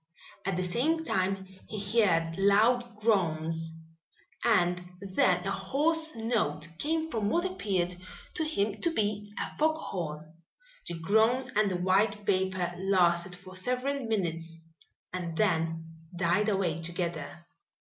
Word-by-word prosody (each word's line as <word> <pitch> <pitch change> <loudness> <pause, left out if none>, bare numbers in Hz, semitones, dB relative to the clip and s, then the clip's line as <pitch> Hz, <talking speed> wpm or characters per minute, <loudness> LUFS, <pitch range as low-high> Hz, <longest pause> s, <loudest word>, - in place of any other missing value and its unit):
At 195 -2 0
the 185 - 0
same 280 - +1
time 190 -6 0 0.2
he 215 +2 +1
heard 165 -5 +2
loud 220 +5 +3
groans 165 -6 +1 0.7
and 180 -6 +3 0.2
then 185 -2 +2
a 195 - 0
hoarse 300 +11 0
note 210 -10 -1
coming 320 +1 0
from 215 -5 0
what 345 +9 +1
appeared 190 - -1 0.4
to 320 - -1
him 210 -10 -1
to 335 - +1
be 210 -6 -1
a - - -4
fog 315 +1 +3
horn. 160 - -5 0.5
The 170 - -2
groans 220 +9 +3
and 210 -1 +4
the 185 - -1
white 190 +4 +3
vapor 190 -3 0
lasted 180 -2 +2
for 185 +1 -12
several 255 +7 -1
minutes 165 -6 -2 0.6
and 170 -3 -4
then 165 -5 +1 0.3
died 180 +5 +2
away 185 -6 0
together. 170 -2 -4
195 Hz, 130 wpm, -30 LUFS, 175-225 Hz, 0.7 s, and